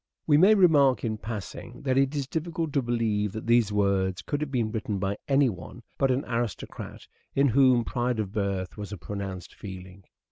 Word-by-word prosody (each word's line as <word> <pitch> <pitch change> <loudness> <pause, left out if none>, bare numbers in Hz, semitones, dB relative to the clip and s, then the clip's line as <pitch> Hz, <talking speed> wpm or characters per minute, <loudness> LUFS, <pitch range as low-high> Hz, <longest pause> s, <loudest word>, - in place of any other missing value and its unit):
We 150 - +4
may 190 +8 +7
remark 150 -9 +4
in 110 -2 -2
passing 110 +2 -7
that 130 -2 +1
it 135 +2 +2
is 140 -2 -1
difficult 160 +1 -3
to 140 - +2
believe 110 -4 0
that 110 - -6
these 115 -2 +3
words 100 -2 +1
could 145 0 -3
have 150 - -2
been 120 -5 -1
written 110 -2 -2
by 100 +1 -2
any 140 0 +4
one 90 -8 -7 0.2
but 135 - +3
an 130 +2 0
aristocrat 115 -3 -4 0.3
in 140 0 +4
whom 130 -1 +4
pride 120 -1 -1
of 105 -3 -2
birth 100 -3 -2
was 105 -1 -6
a 105 - -5
pronounced 95 +2 -6
feeling. 95 -1 -10
115 Hz, 190 wpm, -27 LUFS, 100-135 Hz, 0.3 s, may